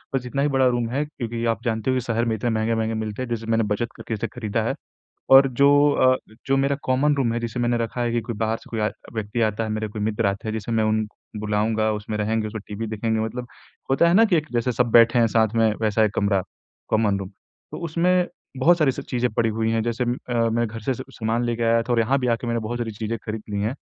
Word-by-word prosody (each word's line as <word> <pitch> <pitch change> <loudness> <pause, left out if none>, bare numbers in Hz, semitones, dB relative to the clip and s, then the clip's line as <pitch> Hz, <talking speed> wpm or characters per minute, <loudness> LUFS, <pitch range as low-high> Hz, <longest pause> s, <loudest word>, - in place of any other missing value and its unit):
बस 125 - -1
इतना 135 +3 -2
ही 145 - +3
बड़ा 130 -1 +4
रूम 120 -2 0
है 140 +4 0
क्योंकि 120 -6 -5
आप 105 - -13
जानते 110 +1 -1
हो - - +1
कि 130 - 0
शहर 115 -1 -1
में 115 -1 0
इतने 120 +3 -2
महँगे-महँगे 110 0 0
मिलते 110 +3 -5
हैं, 130 - -4
जैसे 115 -1 -3
मैंने 115 0 +1
बचत 115 +3 -2
करके 115 - -6
इसे 110 +1 -2
खरीदा 110 -1 -3
है। - - 0 0.6
और 135 +1 +8
जो 140 - +7 0.2
अ, 130 0 +4 0.3
जो 135 0 +2
मेरा 140 +1 +1
कॉमन 140 +3 +2
रूम 125 -4 +1
है, 120 - -1
जिसे 120 +1 -3
मैंने 120 0 +1
रखा 120 - -6
है 120 -1 0
कि 120 - +1
कोई 115 - -2
बाहर 110 +1 0
से - - -17
कोई 110 -2 -3
आए 105 - +1 0.2
व्यक्ति 110 +2 -3
आता 110 +2 -3
है, 110 - -4
मेरे 110 0 -2
कोई 105 0 -5
मित्र 110 0 0
आते 100 +2 -2
हैं, 110 - -1
जिसे 110 +1 -4
मैं 110 -1 +2
उन 110 0 +1 0.3
बुलाऊँगा, 110 +1 +1
उसमें 105 0 -4
रहेंगे, 110 +1 0
उसमें 110 0 -5
टीवी 110 +2 -4
देखेंगे, 110 +1 -1
मतलब 120 +3 -4 0.4
होता 170 +5 +4
है 170 - +3
ना 225 +3 +7
कि 190 -6 +3
एक 155 0 0
जैसे 120 +1 0
सब 120 0 +1
बैठे 115 +1 +6
हैं 115 - +5
साथ 110 0 +4
में, 115 -1 +3
वैसा 110 0 +2
एक 105 0 -1
कमरा 100 -2 +1 0.5
कॉमन 105 -3 +2
रूम 95 0 -6 0.4
तो - - -5
उसमें 175 +3 +2 0.3
बहुत 170 +7 +4
सारी 145 -5 +3
सब - - -6
चीज़ें 125 -1 0
पड़ी 115 +1 +1
हुईं 115 0 +1
हैं, 115 0 +1
जैसे 120 +2 -1
म 120 +1 -1
अ, 125 - -2 0.2
मैं 120 +1 +1
घर 115 0 -7
से 130 - 0
स - - -6
सामान 115 +1 -1
लेके 120 0 -1
आया 115 0 +3
था 120 +1 -2
और 120 - +2
यहाँ 130 +5 +2
भी 125 - -1
आके 120 - -6
मैंने 115 0 0
बहुत 115 +2 -4
सारी 115 -2 -3
चीज़ें 110 +2 -4
खरीद 110 0 -4
लीं 100 -1 -2
हैं। 110 +5 -1
115 Hz, 270 wpm, -23 LUFS, 110-125 Hz, 0.6 s, और